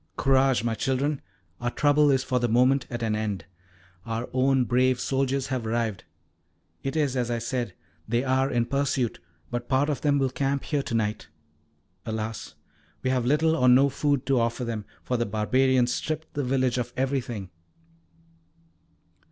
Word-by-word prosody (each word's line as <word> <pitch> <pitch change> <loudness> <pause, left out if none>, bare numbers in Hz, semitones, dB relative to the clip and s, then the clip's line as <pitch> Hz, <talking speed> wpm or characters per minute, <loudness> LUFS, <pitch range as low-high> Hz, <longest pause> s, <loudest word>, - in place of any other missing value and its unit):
"Courage, 135 -3 +3
my 115 -1 0
children! 135 +5 -1 0.4
Our 120 - -1
trouble 145 +3 +3
is 135 -1 +3
for 130 -1 0
the 120 - +1
moment 125 +3 +3
at 120 -1 -4
an 110 -1 0
end. 105 -5 -3 0.6
Our 115 +3 -3
own 130 0 +3
brave 125 +1 +2
soldiers 135 0 0
have 125 -4 -2
arrived. 110 -4 -1 0.8
It 135 +3 -3
is 145 -4 +1
as 125 -2 0
I 120 - 0
said 120 -3 -3 0.3
they 120 +2 +1
are 130 0 +2
in 120 -2 +1
pursuit, 135 -3 -1 0.3
but 120 0 -4
part 140 +2 +2
of 145 - -3
them 145 -1 +2
will 135 -2 +1
camp 140 +1 -1
here 145 -2 -1
to 125 -3 -4
night. 110 -2 -1 0.8
Alas! 110 0 -5 0.5
we 130 - +1
have 125 -2 0
little 160 +4 +3
or 125 -3 +4
no 135 +3 +6
food 140 -1 0
to 135 -3 +2
offer 115 +2 -1
them, 110 -3 -4 0.2
for 125 - -1
the 120 - 0
barbarians 125 +4 +2
stripped 155 +1 -4
the 145 - -1
village 130 -1 +1
of 120 0 -4
everything." 125 -8 -2
130 Hz, 170 wpm, -26 LUFS, 120-135 Hz, 0.8 s, no